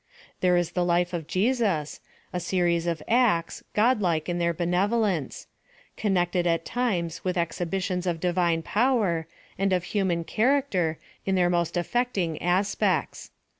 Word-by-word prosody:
There 180 -1 +3
is 175 -2 0
the 180 - 0
life 175 +1 +1
of 165 -3 -4
Jesus, 195 - 0 0.3
a 180 - -1
series 175 -1 0
of 165 -3 -2
acts, 225 -9 +2
godlike 205 -9 +2
in 175 -1 -1
their 170 0 +2
benevolence; 180 - 0 0.5
con 205 -3 0
nected 175 0 +1
at 165 -1 0
times 185 -10 -2
with 185 0 -1
exhibitions 180 +2 -2
of 170 -2 -1
divine 175 -2 +1
power, 205 -9 +1 0.3
and 195 0 +1
of 180 -1 +1
human 180 -4 0
character, 215 - +1 0.3
in 195 - 0
their 180 -1 +3
most 170 0 0
affecting 185 -4 -1
as 185 +4 +1
pects. - - -1
180 Hz, 145 wpm, -26 LUFS, 170-200 Hz, 0.5 s, There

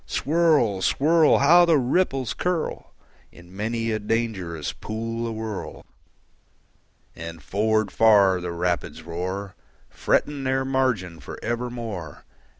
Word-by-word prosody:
Swirl, 150 - +2
swirl! 155 - +4
How 170 +5 +6
the 170 -3 +4
ripples 135 -2 0
curl 180 -3 -3 0.4
In 85 +1 -16
many 115 +2 -2
a 110 - -1
dangerous 105 -8 -2
pool 115 +2 -4
awhirl! 110 -2 -6 1.3
And 80 -1 -8
forward 110 +4 0
far 100 -5 +4
the 90 0 -4
rapids 85 -1 -2
roar, 95 +4 -5 0.4
Fretting 145 -2 0
their 130 0 0
margin 125 -11 -1
for 70 - -9
evermore. 115 -9 -5
110 Hz, 110 wpm, -24 LUFS, 90-130 Hz, 1.3 s, How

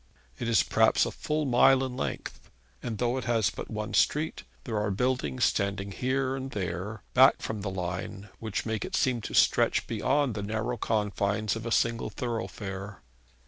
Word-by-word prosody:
It 120 - -2
is 110 -6 +4
perhaps - - +3
a - - -3
full 150 0 -2
mile 130 +1 +5
in 130 -1 -4
length; 130 - -5 0.3
and 115 -3 -4
though 120 +2 0
it - - -7
has 115 -4 +2
but - - -7
one 105 -1 -4
street, 155 +2 +2 0.2
there 110 -4 -2
are 105 0 0
buildings 125 +4 0
standing 100 0 0
here 130 +4 0
and 135 0 -5
there, 100 +1 -4
back 130 +2 +6
from 110 -2 -3
the 100 - -3
line, 95 +2 -5
which 110 -3 -3
make 110 -1 -2
it - - -3
seem 125 -3 +1
to - - -5
stretch - - +4
beyond 145 -4 +1
the 105 - -4
narrow 110 +4 -2
confines 105 -1 0
of 115 +1 -5
a - - -3
single 115 0 +1
thoroughfare. 105 -4 -5
110 Hz, 180 wpm, -28 LUFS, 100-125 Hz, 0.3 s, back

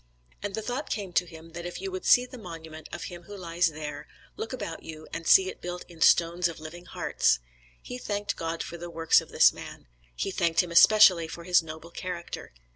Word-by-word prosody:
And 205 -1 -3
the 220 - -4
thought 250 +6 -4
came 200 -4 -4
to 180 - +2
him 165 0 -12
that 170 +1 -6
if 175 - -7
you 195 0 -4
would 185 0 -5
see 245 - +6
the 250 0 -11
monument 160 -4 -9
of - - -6
him 175 -1 -8
who 205 +1 -9
lies 175 -1 +1
there, 155 -1 -6 0.3
look - - -5
about - - -5
you 155 -1 -10
and 165 -1 -5
see 190 -1 +7
it - - -7
built 180 0 -6
in 170 -2 -15
stones 170 +2 +4
of 165 -2 -8
living 165 +3 -10
hearts. 60 - +1 0.5
He 250 - -7
thanked 205 -3 -3
God 165 0 -3
for 170 - -7
the 175 0 -7
works 165 -1 +3
of - - -13
this - - +6
man; - - -10 0.3
he 195 - -2
thanked 170 -2 +2
Him 175 - -8
especially 185 -2 +7
for 170 +1 -8
his 175 0 +4
noble 160 +1 -10
character. 175 -1 -6
175 Hz, 220 wpm, -28 LUFS, 165-190 Hz, 0.5 s, see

